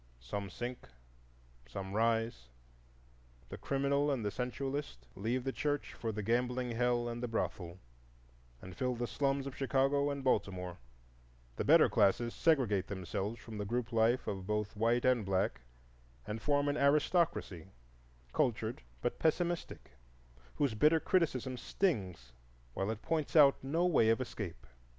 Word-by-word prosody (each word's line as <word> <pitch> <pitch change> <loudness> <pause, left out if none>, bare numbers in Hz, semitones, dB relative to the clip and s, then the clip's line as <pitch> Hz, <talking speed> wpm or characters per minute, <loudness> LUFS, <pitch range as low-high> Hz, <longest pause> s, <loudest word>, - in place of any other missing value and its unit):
Some 100 +9 -5
sink, 120 +6 -6 0.8
some 95 +9 -6
rise. 115 - 0 1.0
The - - -7
criminal 140 +1 +1
and 130 -6 -1
the 105 - 0
sensualist 130 - -4
leave 120 +5 -1
the 135 - -1
church 145 +1 -2
for 115 - -3
the 105 -1 -4
gambling 125 +2 0
hell 120 0 +1
and 120 0 -4
the 125 - -2
brothel, 90 -6 -3 0.9
and 95 -1 -9
fill 125 +3 -1
the 120 +1 -2
slums 135 +2 0
of 140 - -6
Chicago 135 +1 +2
and 140 -1 -4
Baltimore; 90 -8 -1 0.8
the - - -2
better - - +6
classes 115 +4 +2
segregate 125 - +2
themselves 100 +3 -4
from 110 -3 -8
the - - -1
group 120 +3 -2
life 115 +3 +3
of 95 -2 -4
both 105 0 -2
white 115 +3 +2
and 125 -3 +3
black, 95 -7 0 0.6
and 110 +1 -5
form 145 -1 +2
an 145 +1 0
aristocracy, 140 - +1 0.7
cultured 110 - 0 0.2
but - - -1
pessimistic, 170 +2 -1 0.6
whose 140 -5 +1
bitter 150 +9 +4
criticism 140 -7 0
stings 95 - -2 0.4
while 95 +8 -2
it 110 -1 -4
points 160 -1 -1
out 140 -4 +6
no 160 +6 +1
way 140 -11 +4
of 115 - +3
escape. 105 - -6
120 Hz, 145 wpm, -33 LUFS, 105-140 Hz, 1.0 s, better